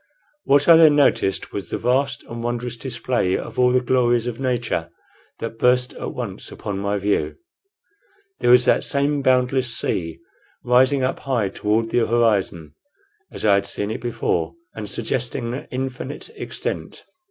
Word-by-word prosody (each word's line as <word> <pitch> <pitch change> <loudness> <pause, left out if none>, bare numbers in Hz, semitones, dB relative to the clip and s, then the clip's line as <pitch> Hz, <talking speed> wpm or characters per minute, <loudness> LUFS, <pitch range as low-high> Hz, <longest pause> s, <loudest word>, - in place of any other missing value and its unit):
What 140 +1 +3
I 165 -1 +9
then 155 -3 +7
noticed 135 -9 +2
was 100 - -5
the - - -2
vast 130 +3 0
and 115 0 -7
wondrous 120 0 -3
display 120 -5 -1
of - - -7
all 125 0 +5
the 125 0 +3
glories 120 -2 +2
of 120 -2 -4
nature 125 -3 -1 0.5
that 115 0 -6
burst 125 +1 +3
at - - -6
once 110 -6 -5
upon 100 -2 -5
my 100 +1 -1
view. 100 +1 -1 1.0
There - - +1
was 125 0 +7
that - - +3
same 140 +1 0
boundless 130 -2 +2
sea, 80 -2 -2 0.5
rising 130 +2 +3
up 130 - -1
high 120 -7 -1
toward 110 +3 -1
the 120 - +2
horizon, 100 -9 +1 0.6
as - - -5
I 105 - +5
had 100 0 +1
seen 105 +1 -2
it - - -5
before, 115 - -2 0.2
and 105 -2 -5
suggesting 115 +2 -2 0.2
infinite 130 - -5
extent. - - -5
120 Hz, 155 wpm, -22 LUFS, 110-130 Hz, 1.0 s, I